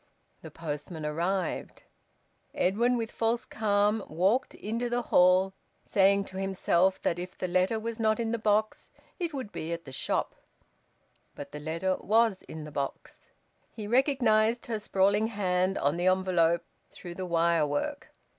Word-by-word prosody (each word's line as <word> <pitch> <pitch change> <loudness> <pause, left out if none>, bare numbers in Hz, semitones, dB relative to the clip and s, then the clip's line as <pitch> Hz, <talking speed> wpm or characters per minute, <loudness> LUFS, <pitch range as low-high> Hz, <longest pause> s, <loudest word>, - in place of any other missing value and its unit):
The - - -9
postman 155 0 -6
arrived. 170 +4 -2 0.7
Edwin 235 +7 +2
with 225 -1 -3
false 230 +1 0
calm 210 0 +1
walked 190 - +1
into 230 +3 -3
the 240 0 -1
hall, 185 -1 +4 0.3
saying 200 0 +3
to 190 0 -7
himself 190 -1 +1
that 170 - 0
if 180 +1 -7
the 185 - -2
letter 185 +5 +1
was 230 +1 -5
not 220 0 +2
in 225 -1 -1
the 235 - -1
box 215 0 0 0.3
it 340 -2 -2
would 260 -8 -5
be 170 -2 -5
at 170 0 -4
the 135 - -9
shop. - - -1 1.0
But 145 - -8
the 150 - -7
letter 165 +5 -1
was 220 -2 +2
in 160 -1 -9
the 150 - -9
box. 140 -1 -6 0.4
He 215 - -8
recognised 235 -2 +2
her 225 -2 -3
sprawling 200 +1 +2
hand 190 -3 0
on 145 +4 +1
the 175 +1 0
envelope 180 -3 +2 0.3
through 175 - -9
the 185 +1 -5
wirework. 170 - 0
190 Hz, 155 wpm, -29 LUFS, 170-220 Hz, 1.0 s, hall